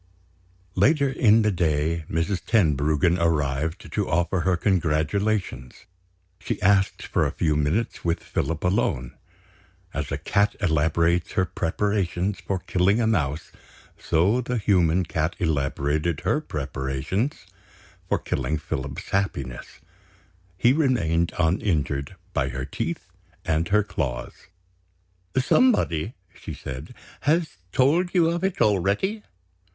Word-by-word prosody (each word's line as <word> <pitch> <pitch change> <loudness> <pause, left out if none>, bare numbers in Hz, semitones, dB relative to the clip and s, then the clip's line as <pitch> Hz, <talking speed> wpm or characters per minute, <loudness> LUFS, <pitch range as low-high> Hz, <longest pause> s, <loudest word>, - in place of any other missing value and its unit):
Later 140 +2 +3
in 115 -3 +4
the 105 - +2
day, 80 -2 0
Mrs. 85 +4 -1
Tenbruggen 80 - +2
arrived 80 -1 -1
to - - -1
offer 85 +3 +1
her 90 0 +1
congratulations. 85 - -1 0.5
She - - -3
asked 95 -1 +2
for - - 0
a - - -3
few 75 -2 0
minutes 80 +10 -1
with 85 -1 -1
Philip 80 -2 -2
alone. 85 - 0 0.8
As - - -3
a - - -1
cat 100 +1 +1
elaborates 85 0 +1
her 95 - +2
preparations 95 +1 -1
for 95 - -2
killing 95 +4 +1
a 115 - +2
mouse, 80 -9 -1 0.4
so 100 +10 +2
the 125 0 -2
human 95 -4 +3
cat 80 +1 -1
elaborated 75 0 0
her - - +1
preparations 70 - -3 0.6
for - - +2
killing 70 +4 -2
Philip's 70 -2 -5
happiness, 95 -10 -3 0.8
he 120 +7 +4
remained 85 - +1
uninjured 80 -4 0 0.2
by 65 -2 0
her 65 +1 -4
teeth - - -4 0.3
and 80 +1 +1
her 105 +1 +3
claws. 65 -11 -3 1.0
"Somebody," 130 - +2 0.2
she - - -8
said, 70 - -8 0.2
"has 155 - 0
told 170 +8 +2
you 165 -2 +4
of 170 +1 -2
it 190 -1 -1
already?" 105 - +1
85 Hz, 120 wpm, -24 LUFS, 75-105 Hz, 1.0 s, in